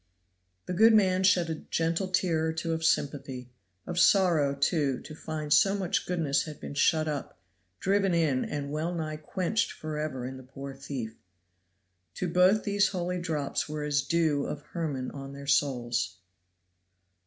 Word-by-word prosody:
The 180 - -3
good 220 +4 +6
man 185 -3 +4
shed 185 -2 +4
a 155 - -5
gentle 165 +3 0
tear 175 -4 +1
or 160 - -1
two 165 +1 -2
of 160 0 -3
sympathy 135 -5 -1 0.3
of 175 0 -2
sorrow, 170 -9 +4
too, 140 -2 +1
to 155 - -10
find 155 -1 -2
so 195 0 +5
much 195 -1 -1
goodness 155 -6 +1
had 155 -2 -8
been - - -7
shut 155 +2 +2
up, 145 -8 -4 0.4
driven 195 0 +2
in 155 -7 +2
and 145 -1 -4
wellnigh 155 0 -2
quenched 185 +8 -1
forever 150 -4 -4
in 130 +1 -6
the - - -10
poor 135 +2 -8
thief. 135 -5 -6 1.0
To 185 - -2
both 180 +5 +4
these 205 -1 +2
holy 180 -1 -2
drops 155 -4 -2
were 150 0 -3
as 145 -1 +1
the 135 - -13
dew 160 -4 +2
of 145 - -5
Hermon 150 -7 -3
on 135 0 -8
their 140 0 -9
souls. 120 -8 0
155 Hz, 165 wpm, -29 LUFS, 140-180 Hz, 1.0 s, good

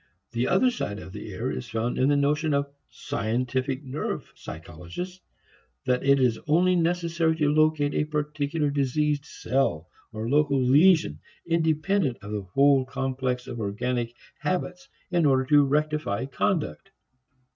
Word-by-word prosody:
The 120 +2 0
other 250 +7 +3
side 105 - -4
of 95 - -10
the 105 - -7
error 115 +7 -3
is 120 - -5
found 115 +2 -2
in 130 - +3
the 145 - +4
notion 150 +2 +1
of 140 0 -1 0.2
"scientific" 130 0 -2
nerve 135 +2 -4
physiologists 85 - -8 0.6
that 125 0 +1
it 140 0 +4
is 125 -4 +2
only 180 +4 +4
necessary 170 -1 +1
to 150 -2 +1
locate 155 -2 +2
a - - +1
particular 150 0 -1
diseased 145 +1 0
cell 120 - -1 0.2
or 110 0 -4
local 140 +1 +2
lesion, 140 - +4 0.3
independent 160 -2 +1
of 105 - -7
the 105 -1 -2
whole 135 +8 +3
complex 130 -1 -2
of 120 - -6
organic 120 +3 -2 0.2
habits, 180 +3 -3 0.2
in 170 -4 +3
order 130 -1 +3
to 145 +1 +5
rectify 150 -6 0
conduct. 190 +5 -2
140 Hz, 145 wpm, -26 LUFS, 125-155 Hz, 0.6 s, to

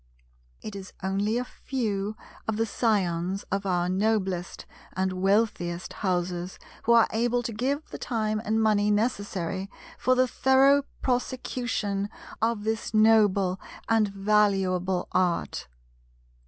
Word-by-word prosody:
It 215 - -6
is 190 -1 -8
only 200 +4 0
a 250 - 0
few 215 -7 -3 0.3
of 220 -1 -1
the 225 - +2
scions 195 -5 0
of 195 +1 -1
our 175 -1 +1
noblest 190 -2 -1 0.3
and 190 0 0
wealthiest 185 -2 0
houses, 180 -2 -1 0.3
who 235 - +5
are 230 -1 +6
able 240 +2 +1
to 235 -1 -4
give 275 +7 -1
the - - -7
time 215 -3 -1
and 220 0 +1
money 210 -1 +3
necessary 200 -4 -1 0.3
for 255 - +3
the 255 0 +3
thorough 270 +3 +4 0.2
prosecution 245 -5 -1 0.3
of 225 -2 +1
this 220 0 -2
noble 205 -4 +4 0.3
and 225 -2 +3
valuable 195 -3 +1
Art. 180 - 0
210 Hz, 125 wpm, -27 LUFS, 190-225 Hz, 0.3 s, are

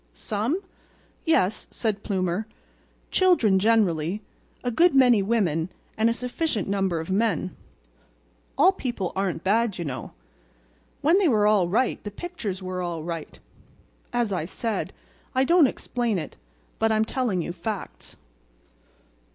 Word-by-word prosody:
"Some? 225 - -1 0.7
Yes," 215 - +2
said 215 -3 -2
Plumer. 190 +1 -1 0.6
"Children 295 - +4
generally, 200 -3 +2 0.4
a 245 - 0
good 335 +5 +4
many 250 -5 +6
women 190 -6 +1 0.3
and 220 +1 +3
a - - +2
sufficient 250 0 -2
number 195 -4 0
of 160 +3 -5
men. 195 -3 0 1.0
All 375 - +6
people 240 - -3
aren't 190 -3 -1
bad, 215 +1 +2
you 170 - -4
know. 130 -3 -5 0.9
When 330 +7 +4
they 390 - +3
were 215 -7 +3
all 210 -4 +4
right 230 +8 0
the 205 - -4
pictures 205 - -5
were 185 0 -3
all 170 -3 -3
right. 165 -2 -6 0.7
As 240 -4 0
I 175 -4 -1
said, 220 +5 -3 0.4
I 260 - +4
don't 335 +1 +5
explain 240 -4 -2
it, 155 -4 -5 0.4
but 225 0 +3
I'm 220 0 +3
telling 220 -8 -1
you 175 - -4
facts." 210 +1 -6
210 Hz, 135 wpm, -25 LUFS, 185-245 Hz, 1.0 s, many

